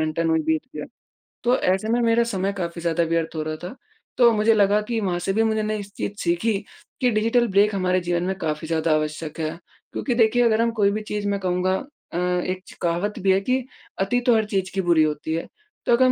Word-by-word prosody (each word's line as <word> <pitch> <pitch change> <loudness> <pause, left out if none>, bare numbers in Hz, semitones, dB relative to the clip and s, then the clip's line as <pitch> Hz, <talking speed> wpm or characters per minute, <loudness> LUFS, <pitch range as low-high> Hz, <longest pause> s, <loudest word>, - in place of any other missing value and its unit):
घंटा 155 +1 0
नू 165 -1 +2
ही 160 - +1
बीत 160 0 +1 0.2
गया। 150 - -4 0.6
तो 245 +2 +3
ऐसे 190 +4 +1
में 235 +2 +2
मेरा 230 0 +3
समय 195 -3 -1
काफ़ी 170 -1 -4
ज़्यादा 170 0 +1
व्यर्थ 165 0 -1
हो 155 - -2
रहा 155 0 -3
था 180 +7 -6 0.4
तो 240 -2 +6
मुझे 215 +1 +3
लगा 205 0 +3
कि 225 +2 -2
वहाँ 180 -3 -1
से 185 +2 -1
भी 220 +2 +2
मुझे 220 -1 +1
नई 215 -1 -2
चीज़ 200 0 -5
सीखी 175 +6 +1 0.5
कि 250 - +4
डिजिटल 230 +2 +2
ब्रेक 200 +2 +3
हमारे 185 -1 +1
जीवन 175 0 -1
में 190 +1 -1
काफ़ी 155 0 -2
ज़्यादा 160 0 0
आवश्यक 155 +1 -3
है। 155 -1 -1 0.4
क्योंकि 255 - -1
देखिए 235 +1 +4
अगर 225 -1 +3
हम 230 0 +2
कोई 200 0 +4
भी 215 +1 -2
चीज़ 210 -1 -2
मैं 200 0 0
कहूँगा 185 0 0 0.4
अ, - - -2
एक 180 +1 -1
च - - -12
कहावत 175 +6 -1
भी 195 -1 +3
है 190 - +4
कि 255 +5 0 0.4
अति 195 +6 +1
तो 240 - +5
हर 220 -1 +2
चीज़ 195 -3 -2
की 195 - 0
बुरी 170 -3 +4
होती 155 +1 -2
है 165 - -3 0.4
तो - - +1
अग 240 - -1
हम 255 - +5
190 Hz, 240 wpm, -23 LUFS, 170-220 Hz, 0.6 s, तो